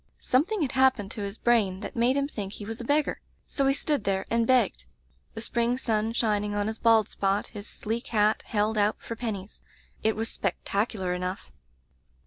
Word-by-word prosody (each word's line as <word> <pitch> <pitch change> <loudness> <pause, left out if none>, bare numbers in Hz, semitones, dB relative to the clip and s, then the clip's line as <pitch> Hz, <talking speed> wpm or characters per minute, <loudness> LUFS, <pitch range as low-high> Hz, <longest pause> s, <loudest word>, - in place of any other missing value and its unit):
"Something 335 +9 +1
had 265 - -1
happened 260 -6 +3
to 220 - -5
his 200 +1 -4
brain 205 -6 +2
that - - -6
made 245 +3 +3
him 280 0 +1
think 205 -8 -5
he 205 - -7
was 225 +3 -5
a - - -5
beggar; 290 +4 +1 0.2
so 275 -1 0
he 270 - +4
stood 290 -5 0
there 195 -1 0
and 230 0 +2
begged, 235 - +2 0.5
the 225 - -4
spring 235 +1 +1
sun 225 -3 0
shining 210 -3 0
on 205 0 0
his 220 +1 -3
bald 225 -2 +5
spot, 195 +1 -1
his 205 0 -8
sleek 225 +3 -3
hat 215 -1 +2
held 215 0 +1
out 205 +1 +3
for 230 - -6
pennies. 215 -4 -5 0.4
It 220 0 +2
was 225 +1 -1
spectacular 200 0 -1
enough. 180 - -4
220 Hz, 190 wpm, -27 LUFS, 205-240 Hz, 0.5 s, bald